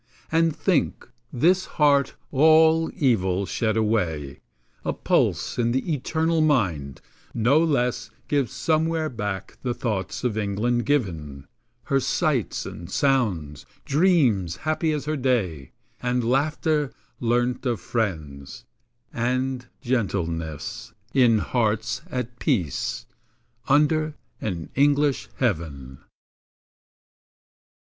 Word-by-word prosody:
And 165 -1 +2
think, 170 -2 0 0.2
this 180 +9 +3
heart, 145 -3 +3 0.2
all 160 +3 +5
evil 100 - +1
shed 110 +4 -1
away, 90 -11 -1 0.4
A - - -1
pulse - - 0
in 120 0 +2
the 145 +6 0
eternal 160 +3 0
mind, 90 - +1 0.3
no 120 +7 +4
less 125 -6 0 0.2
Gives 140 -5 0
somewhere 160 0 0
back 105 -6 -5
the 125 -2 -2
thoughts 95 -5 -3
by 125 - +2
England 115 +4 0
given; 80 - -1 0.4
Her 135 +2 +1
sights 135 -1 0
and 85 +1 -8
sounds; 95 - 0 0.2
dreams 135 - +3
happy 155 +1 +1
as 150 -2 -2
her 155 +1 -1
day; 110 - -1 0.3
And 125 0 0
laughter, 150 +2 +1 0.3
learnt 120 +2 0
of 120 -4 0
friends; 80 - -4 0.5
and 125 +1 -1
gentleness, 85 - -2 0.2
In 120 -4 +5
hearts 110 0 0
at 125 -1 -4
peace, 95 - -1 0.6
under 150 +2 +3 0.3
an 90 -6 -4
English 145 0 +2
heaven. 75 - -2
125 Hz, 105 wpm, -24 LUFS, 95-145 Hz, 0.6 s, all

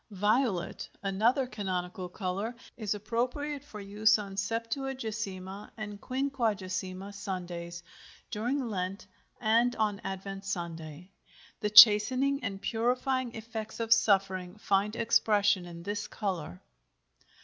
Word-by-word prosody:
VIOLET, 210 -1 0
another 220 +7 +2
canonical 185 -5 -4
color, 195 +5 -3 0.2
is 215 -3 -2
appropriate 250 +7 -2
for 255 -8 -10
use 210 +2 +3
on 200 -2 -6
Septuagesima 220 -3 -3
and 210 -2 -6
Quinquagesima 205 -8 -2
Sundays, 175 -3 -5 0.5
during 245 +5 -1
Lent, 195 0 -3 0.3
and 235 +3 +3
on 210 -2 0
Advent 195 +1 -5
Sunday. 170 -2 -5 0.5
The 210 - 0
chastening 240 +6 +8
and 195 -3 -3
purifying 250 +3 0
effects 220 0 -6
of 225 0 +5
suffering 190 -4 +2
find 205 +1 +1
expression 210 -5 +3
in 170 -1 -9
this 205 +2 -3
color. 175 - -4
210 Hz, 105 wpm, -30 LUFS, 190-230 Hz, 0.5 s, chastening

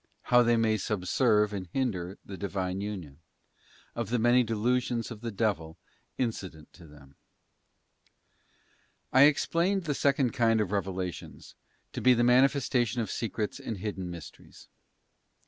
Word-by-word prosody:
How 125 - +8
they 120 -1 +3
may 110 -1 +2
subserve 105 +2 +1
and 95 -2 -5
hinder 95 -5 -3
the 100 - -8
Divine 95 -1 -3
union. 90 -9 -6 0.7
Of 115 -3 -4
the 120 - +1
many 120 +2 +4
delusions 120 +1 -1
of 110 -2 -8
the 120 - -4
devil 95 -7 -2 0.4
incident 95 -10 -4
to 85 -2 -15
them. 70 -2 -17 2.0
I 130 +2 +8
EXPLAINED 170 +6 +1
the 150 -3 -1
second 135 -3 +1
kind 115 -1 +2
of 105 -3 -1
revelations 95 -3 -4 0.4
to - - -4
be 125 0 +5
the 120 - +2
mani 125 +3 +6
festation 125 -4 -1
of 115 -4 -2
secrets 110 -2 -3
and 110 - -5
hidden 95 -2 -5
mysteries. 85 -2 -12
110 Hz, 140 wpm, -29 LUFS, 95-125 Hz, 2.0 s, How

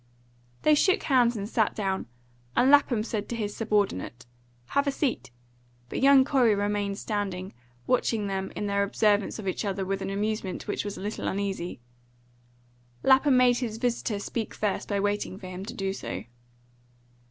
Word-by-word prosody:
They 305 - +5
shook 370 +5 +3
hands 245 -5 +3
and 200 0 -4
sat 220 -1 +1
down, 195 - -2 0.5
and 260 +2 +5
Lapham 270 -6 +4
said 215 -2 -4
to 235 - -2
his 210 -3 -3
subordinate, 200 - -1 0.4
"Have 280 +1 +1
a - - +3
seat;" 270 - -2 0.6
but - - -3
young 275 -1 +7
Corey 250 -6 +3
remained 205 0 -1
standing, 195 -4 -3 0.3
watching 230 -4 +1
them 195 -1 -3
in 210 - -3
their 200 0 +1
observance 205 0 +2
of 210 -3 -6
each 185 - -1
other 195 -2 -2
with 195 +1 -2
an - - -3
amusement 205 -1 -2
which 205 - -2
was 205 -1 -5
a - - -7
little 210 +2 -3
uneasy. 190 -7 -3 1.2
Lapham 265 0 +5
made 250 -1 +5
his 225 -4 -3
visitor 235 -2 -1
speak 220 +2 -4
first 210 -2 -1
by 200 -1 0
waiting 205 -1 -1
for 195 - -11
him 185 +1 -6
to 235 - -6
do 195 -2 -2
so. 95 - -5
210 Hz, 170 wpm, -27 LUFS, 195-240 Hz, 1.2 s, young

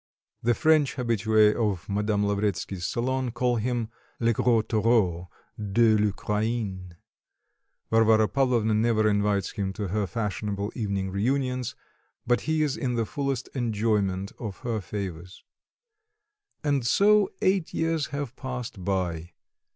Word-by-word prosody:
The 120 0 +2
French 155 -3 +3
habitués 110 -3 +3
of 100 -7 -1
Madame 105 +1 0
Lavretsky's 100 -3 -1
salon 130 +1 -1
call 120 +1 0
him 120 0 -1 0.3
"le 115 0 +2
gros 115 0 +2
taureau 105 -6 +1 0.3
de 110 +2 +3
l'Ukraine;" 105 -3 -1 1.0
Varvara 110 -1 +5
Pavlovna 120 -5 +1
never 110 0 +2
invites 105 -2 +1
him 100 -2 -3
to 100 -2 -4
her 105 +1 -1
fashionable 105 -1 -3
evening 100 -4 -2
reunions, 125 +4 -1 0.5
but 120 0 +2
he 155 -1 +2
is 145 -3 0
in 125 -2 -2
the 115 -1 0
fullest 135 0 -3
enjoyment 105 -5 0
of 105 -5 -5
her 115 -3 -2
favours. 90 -2 -6 1.2
And 140 -3 +1
so 205 - +4
eight 190 -3 +1
years 160 -3 0
have 140 -3 -5
passed 125 -6 -6
by. 90 -3 -2
110 Hz, 125 wpm, -26 LUFS, 100-125 Hz, 1.2 s, Varvara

